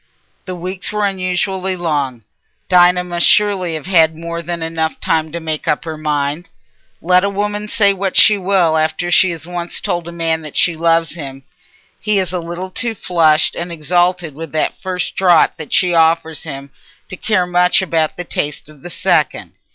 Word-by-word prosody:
The 185 - -5
weeks 180 +2 -3
were 210 0 0
unusually 185 0 -2
long: 145 -9 -2 0.4
Dinah 180 0 +4
must 175 -1 +1
surely 195 -5 +2
have 155 - -6
had 165 -4 +3
more 170 +1 -5
than 170 0 -4
enough 160 -1 -2
time 160 -1 -1
to 170 - -4
make 160 -2 -4
up 150 - 0
her 160 -1 -5
mind. 150 +1 -2 0.5
Let 180 +2 +4
a 200 - +1
woman 205 +1 -3
say 200 -2 +3
what 195 -1 -2
she 215 - +7
will 185 -4 +1
after 160 +3 -1
she 185 +1 +5
has 165 -2 -5
once 175 0 -3
told 175 -1 -3
a - - -6
man 165 -1 -1
that 150 -2 -9
she 170 - +3
loves 165 0 +1
him, 135 -4 -8 0.6
he 210 -1 0
is 185 -2 0
a 180 - -1
little 175 +2 -6
too 230 +3 -2
flushed 165 -4 +2
and 170 +1 -5
exalted 175 +1 0
with 160 +1 -8
that 155 - 0
first 185 -1 -3
draught 175 -3 +3
she 180 -2 +2
offers 160 -1 +1
him 140 -2 -8 0.4
to 185 - -5
care 185 -1 0
much 180 +1 +2
about 160 -4 -1
the 180 - -4
taste 150 -3 -4
of 150 -3 -17
the 175 - -8
second. - - 0
170 Hz, 185 wpm, -16 LUFS, 160-185 Hz, 0.6 s, she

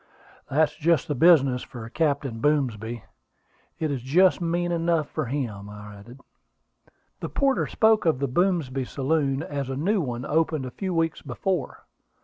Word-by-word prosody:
"That's 150 +1 +2
just 160 -2 +1
the 150 - -1
business 140 -4 +5
for 120 -3 -9
Captain 140 -5 -1
Boomsby: 120 -5 0 0.7
it 155 -2 -1
is 135 -3 -3
just 180 +10 +3
mean 175 +1 0
enough 165 -2 +1
for 155 -2 -3
him," 115 -7 -4
I 105 0 -10
added. 120 +6 -14 1.0
"The - - -5
porter 275 -1 +1
spoke 220 -4 +3
of 160 - +3
the 140 +1 -1
Boomsby 145 -3 0
saloon 140 +1 0
as 140 -3 -4
a 135 - -3
new 190 +8 +1
one 125 -3 -4
opened 155 -2 0
a 125 - -6
few 190 +5 -4
weeks 165 -1 0
before. 160 +5 -3
145 Hz, 155 wpm, -25 LUFS, 125-165 Hz, 1.0 s, business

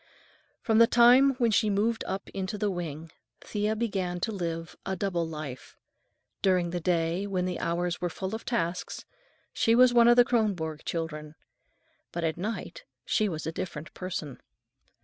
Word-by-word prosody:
From 220 -1 +3
the 230 - +8
time 250 +3 +6
when 240 -3 +2
she 215 0 +3
moved 215 +3 +1
up 190 +1 -4
into 190 +2 -4
the 205 0 0
wing, 165 -3 -5 0.3
Thea 210 +1 -1
began 195 -6 -2
to 225 - -1
live 165 -4 -4
a 190 - -2
double 180 -5 -1
life. 150 -5 -8 0.6
During 180 -3 +2
the 175 - -2
day, 170 +2 0
when 185 -2 -1
the 180 -1 -3
hours 175 +1 -1
were 175 - 0
full 190 +4 -5
of 220 - -4
tasks, 180 -7 -2 0.5
she 230 - +3
was 250 0 +6
one 235 -1 +6
of 240 - +7
the 245 0 +7
Kronborg 185 -11 -1
children, 155 -2 -4 0.8
but 170 - -4
at 160 -1 0
night 225 - -5 0.2
she 215 -2 +1
was 155 -3 -5
a 160 - -2
different 165 -1 -6
person. 170 -7 -5
185 Hz, 170 wpm, -28 LUFS, 165-220 Hz, 0.8 s, the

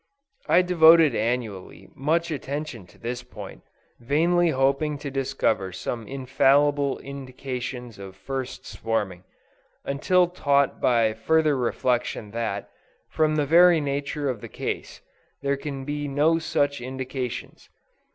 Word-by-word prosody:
I 180 - +5
devoted 165 -4 +6
annually, 110 -4 -3
much 165 +5 0
attention 140 - -5
to - - -20
this 120 +1 -4
point, - - -10 0.4
vainly 170 +8 +2
hoping 140 +2 +1
to 140 -1 -6
discover 130 -8 0
some 110 +5 -5
infallible 140 +1 +2
indications 130 -4 -6
of 95 -1 -9
first 130 +6 -5
swarming; 100 -5 -3 0.6
until 175 +6 +2
taught 140 -6 +1
by 115 -3 +3
further 155 +6 +2
reflection 120 -3 -1
that, 110 -3 -3 0.4
from 155 -1 +2
the 150 -1 +1
very 170 +3 +6
nature 145 0 -2
of 125 -6 -2
the - - -8
case, - - -5 0.4
there 140 0 +1
can 140 -1 -6
be 145 0 -3
no 150 +4 +2
such 145 -4 0
indications. 130 0 -5
135 Hz, 120 wpm, -25 LUFS, 120-150 Hz, 0.6 s, devoted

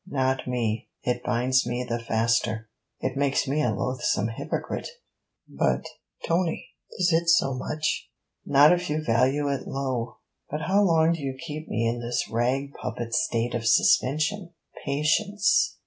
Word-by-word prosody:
'Not 130 -1 0
me. 115 -3 -2
It 125 0 -1
binds 125 +2 +1
me 125 +1 -2
the 120 0 -2
faster.' 115 -1 0 0.3
'It - - -2
makes 140 0 +1
me 145 +3 +1
a 125 - +2
loathsome 115 -1 -1
hypocrite.' 115 - -4 0.6
'But, - - 0 0.4
Tony! 170 0 -1 0.3
is 180 -2 +2
it 165 +1 +2
so 170 -5 +4
much?' 155 +4 -2 0.3
'Not 145 +4 +6
if 180 -1 -2
you 155 +1 -1
value 130 +5 +2
it 140 -1 -3
low.' 130 -3 -3 0.3
'But 150 +2 -3
how 195 +6 +2
long 165 -4 +4
do 165 - -5
you 135 -1 -4
keep 155 0 -6
me 115 +1 0
in 120 +1 -1
this 120 +1 -2
rag 130 +5 0
puppet's 115 -1 -2
state 115 +1 -1
of 115 -1 -2
suspension?' 155 - +2 0.3
'Patience.' 200 +9 +2
135 Hz, 150 wpm, -26 LUFS, 120-155 Hz, 0.6 s, Not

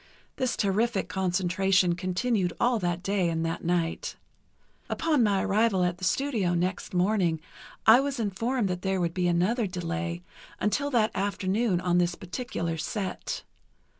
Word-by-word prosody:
This 255 -2 0
terrific 205 +1 +1
concentration 185 0 +2
continued 185 +1 0
all 240 -1 +2
that 175 -2 -2
day 195 -3 +1
and 165 0 -1
that 165 +1 -3
night. 170 -1 -1 0.7
Upon 310 -5 +1
my 200 -4 +2
arrival 205 -2 +2
at 175 0 -1
the - - -11
studio 205 -3 +1
next 180 +2 -2
morning 180 -3 +2 0.5
I 225 +3 +8
was 275 -1 -2
informed 225 +2 0
there 185 +1 -1
would 170 -2 0
be 180 -1 0
another 195 +7 +1
delay 175 -1 -4 0.4
until 280 +8 0
that 230 -5 +2
afternoon 195 0 0
on 180 0 +2
this 175 0 +1
particular 175 -4 -4
set. 185 +4 -3
190 Hz, 140 wpm, -27 LUFS, 175-220 Hz, 0.7 s, I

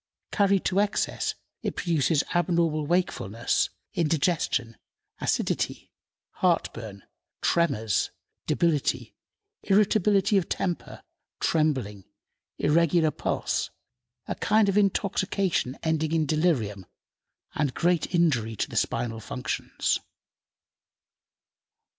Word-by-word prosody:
Carried 200 -2 +2
to 190 - +2
excess 205 0 0 0.3
it - - -3
produces 160 -4 +1
abnormal 170 -3 +1
wakefulness, 120 - 0 0.2
indigestion, 155 -7 0 0.4
acidity, - - -1 0.5
heartburn, 115 - -1 0.4
tremors, 115 - +1 0.4
debility, 165 -4 +1 0.5
irritability 205 0 +3
of 175 - -6
temper, 180 -3 -3 0.4
trembling, 130 - 0 0.5
irregular 165 0 +3
pulse, - - -1 0.6
a - - -1
kind 215 0 +2
of 195 - +1
intoxication 195 -7 +1
ending 160 0 0
in 160 -2 +2
delirium, 135 - 0 0.7
and 145 -4 -1
great 175 -1 +1
injury 125 -10 +2
to - - -1
the - - -4
spinal 115 -2 -1
functions. 125 +3 -2
165 Hz, 85 wpm, -26 LUFS, 130-180 Hz, 0.7 s, irritability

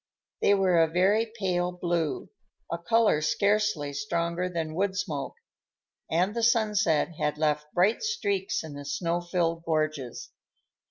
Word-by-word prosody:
They 205 - +5
were 185 -4 +3
a 165 - +4
very 200 +7 +2
pale 180 -3 0
blue, 175 -3 -2 0.4
a 170 - -2
color 220 -3 +3
scarcely 200 -3 +1
stronger 170 +5 -2
than 165 -3 -3
wood 190 +2 -1
smoke, 155 -9 -3 0.7
and 180 +5 +1
the 235 - -2
sunset 215 -9 +2
had 150 0 0
left 150 -1 0
bright 190 +6 +3
streaks 200 - -1
in 155 -2 -8
the 145 0 -7
snow 165 +5 -1
filled 170 -1 -1
gorges. 155 -6 -2
175 Hz, 140 wpm, -27 LUFS, 155-200 Hz, 0.7 s, They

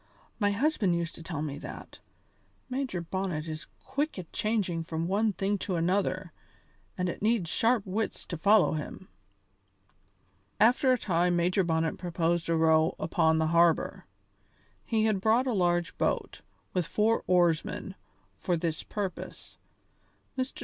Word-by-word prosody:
"My 205 -2 +3
husband 205 - +1
used 170 -1 -2
to - - -10
tell 160 -3 -4
me 145 -2 -4
that. - - -9 0.7
Major 255 -9 -2
Bonnet 170 -3 -3
is 155 0 -6 0.2
quick 295 -1 -2
at 180 -3 -8
changing 205 -6 0
from 165 0 -3
one 210 +4 +2
thing 200 +2 -1
to 185 - -2
another, 185 0 0 0.6
and 180 - 0
it 175 - -4
needs 210 -6 +1
sharp 230 -2 +2
wits 205 +3 -3
to 175 - -5
follow 200 +5 +4
him." 155 +4 -6 1.5
After 245 +5 +5
a 255 - +4
time 175 -4 +1
Major 180 +3 +2
Bonnet 160 -1 0
proposed 170 -1 -1
a 165 - +3
row 160 0 +3
upon 160 0 +2
the 160 - +2
harbour 170 -1 +2 0.8
he 220 -2 +1
had 210 -3 +1
brought 225 +5 +3
a 255 - 0
large 175 -3 +1
boat, - - -1 0.3
with 180 -3 0
four 220 +4 +1
oarsmen, 175 +1 +1 0.5
for 175 -2 0
this 160 -1 -2
purpose. 200 -3 -6 0.8
Mr. 260 0 -3
180 Hz, 145 wpm, -29 LUFS, 165-210 Hz, 1.5 s, After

